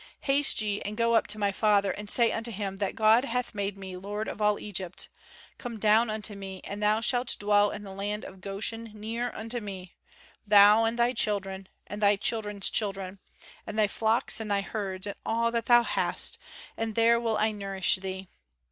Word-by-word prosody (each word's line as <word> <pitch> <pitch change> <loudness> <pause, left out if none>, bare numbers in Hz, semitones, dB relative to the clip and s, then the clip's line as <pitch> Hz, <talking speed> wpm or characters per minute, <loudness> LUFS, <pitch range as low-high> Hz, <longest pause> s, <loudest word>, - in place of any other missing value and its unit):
"Haste 275 -3 +3
ye, 205 -1 -2
and 210 +1 -5
go 230 0 +2
up 225 - +3
to 210 - 0
my 205 -1 0
father, 200 -1 +2
and 210 0 -7
say 235 0 +3
unto 225 +1 -3
him 195 -3 -4
that 200 -1 -2
God 220 +3 +4
hath 250 -2 -3
made 200 -1 -3
me 190 -1 -8
lord 205 +4 -5
of - - -6
all 210 0 +3
Egypt: 190 -3 -5 0.5
come 240 -3 -6
down 220 +2 +3
unto 215 -1 -4
me, 195 -1 -8
and 205 +1 -6
thou 210 +1 +2
shalt 245 +1 +1
dwell 205 0 +3
in 205 - -6
the 195 -1 -9
land 205 +2 -4
of 190 - -12
Goshen 220 +4 -3
near 230 +3 -4
unto 230 +2 -4
me, 190 -4 -8 0.5
thou 210 +1 +6
and 225 +1 -1
thy 240 +1 +2
children, 195 -4 -1 0.2
and 205 +1 -7
thy 205 0 +5
children's 205 -1 -1
children, 195 -2 -2 0.5
and 215 - -6
thy 215 - +4
flocks 220 +3 +1
and 220 -1 -5
thy 200 -1 +1
herds, 195 -2 -4
and 200 - -6
all 230 +1 0
that 235 -1 -2
thou 240 -1 +6
hast, - - +1 0.4
and 225 -1 -4
there 230 +1 +4
will 225 -2 -1
I 215 +1 +1
nourish 195 -2 0
thee. 190 0 -6
210 Hz, 200 wpm, -28 LUFS, 200-225 Hz, 0.5 s, thou